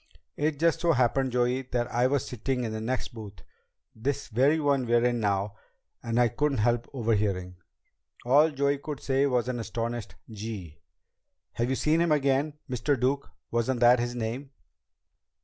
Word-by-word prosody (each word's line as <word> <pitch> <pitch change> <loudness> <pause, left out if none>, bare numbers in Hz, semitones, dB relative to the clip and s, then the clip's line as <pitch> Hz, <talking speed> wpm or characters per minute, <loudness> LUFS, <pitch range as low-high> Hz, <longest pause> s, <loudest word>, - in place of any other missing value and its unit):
"It 150 0 0
just 165 +1 +2
so 170 -1 +3
happened, 130 0 +2
Joey, 125 +1 +1
that 125 -2 -2
I 120 +1 +3
was 140 0 0
sitting 125 +1 -2
in 115 - -3
the 110 0 -4
next 125 +3 -2
booth 105 - -10 0.5
this 135 +5 -3
very 135 +7 +3
one 140 -4 +1
we're 120 +1 +3
in 120 -1 +1
now 100 -1 0 0.5
and 115 +1 -1
I 120 - +5
couldn't 145 +4 0
help 120 +2 +1
overhearing." 105 -7 -1 0.7
All 145 +6 +5
Joey 140 -1 0
could 145 -1 -6
say 135 +1 +1
was 125 -3 +1
an 125 -1 -2
astonished: 115 -2 -4
"Gee!" 105 -7 -7 0.7
"Have 120 +1 -1
you 135 - +1
seen 155 +5 +2
him 170 -2 +2
again? 145 +1 +1
Mr. 130 +2 0
Duke? 135 +2 0 0.2
Wasn't 120 +2 0
that 120 +1 +6
his 120 +1 -2
name?" 120 +4 -4
125 Hz, 165 wpm, -28 LUFS, 115-140 Hz, 0.7 s, that